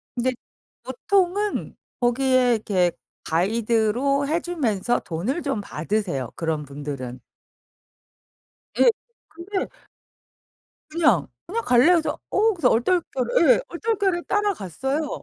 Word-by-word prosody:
근데 255 +1 +1 0.5
보통은 390 +9 0 0.2
거기에 250 0 +3
이렇게 185 -5 +1 0.3
가이드로 230 - +1
해 325 +3 +1
주면서 245 - 0
돈을 200 - -3
좀 275 -7 -2
받으세요, 165 - -2
그런 160 -2 -2
분들은. 140 -3 -6 1.6
예. - - +7 0.5
근데 375 +3 -3 1.2
그냥. 330 +2 +3 0.2
그냥 455 +6 -2
"갈래?" 245 +2 +5
그래서 330 -3 +1
어 440 +2 +3
그래서 325 -8 +2
얼떨결에 340 - +2
예. - - +2
얼떨결에 385 -2 -1
따라갔어요. 295 - -2
255 Hz, 240 characters per minute, -23 LUFS, -, 1.6 s, 예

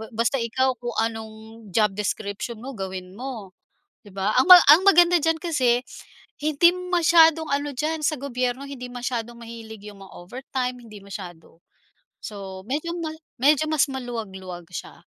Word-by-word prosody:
Basta 230 +4 +1
ikaw 255 +2 0
kung 240 -1 -5
anong 225 0 -5
job 215 -3 +3
description 205 +3 -4
mo 270 - -6
gawin 190 -5 -6
mo, 225 -2 -7 0.5
'di 205 - -15
ba. 195 +2 -1
Ang - - +5
ma 360 - +12
ang 315 +6 +8
maganda 350 -2 +6
diyan 325 0 +1
kasi 260 -8 +1 0.6
hindi 310 +3 +4
masyadong 330 -3 +3
ano 285 -1 -2
diyan 315 +4 -2
sa 305 0 0
gobyerno, 255 -1 -3
hindi 270 -3 -8
masyadong 240 -1 -4
mahilig 225 -2 -10
'yong 205 -1 -11
mga 195 - -13
overtime 250 +5 -5
hindi 225 -3 -13
masyado. 175 -4 -10 0.6
So 195 -3 -8
medyo 310 +5 -2
ma 320 - -3 0.3
medyo 295 +2 +4
mas 305 -2 +2
maluwag-luwag 195 -9 -7
siya. 180 - -8
245 Hz, 150 wpm, -24 LUFS, 210-290 Hz, 0.6 s, ma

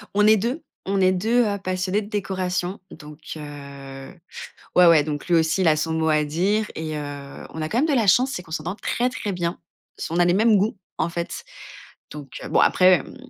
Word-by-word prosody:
On 210 - +4
est 215 0 +6
2, 250 - -2 0.2
on 195 0 0
est 185 0 +5
2 225 +6 +2
heu, 200 -1 -1
passionnés 185 +2 -1
de 205 - -9
décoration. 185 -2 -2
Donc 150 -1 -12 0.2
heu, 140 -1 -9 0.6
ouais, 180 - +7
ouais, 160 -3 +6
donc 150 +1 -5
lui 175 - +3
aussi, 160 +3 +2
il 175 - +3
a 155 - +5
son 160 +1 -1
mot 160 0 +1
à 155 -1 +3
dire, 190 +8 0
et 155 -1 -4
heu, 145 -1 -7
on 160 - -7
a 155 - -1
quand 235 - 0
même 305 - +3
de 295 - +1
la 225 -6 +2
chance, 255 +7 +4
c'est 180 - -4
qu'on 160 - -17
s'entend 165 +4 -3
très, 245 +3 -1
très 210 -5 -4
bien. 170 -1 -3 0.4
Ce 165 - -5
on - - 0
a 175 - +4
les 175 - +3
mêmes 215 +1 +4
goûts, 205 +1 0 0.2
en 160 - 0
fait. 170 0 -5 0.7
Donc 145 -3 -9
bon, - - +3
après 185 -4 +5
mmh - - -13
180 Hz, 225 wpm, -23 LUFS, 155-205 Hz, 0.7 s, ouais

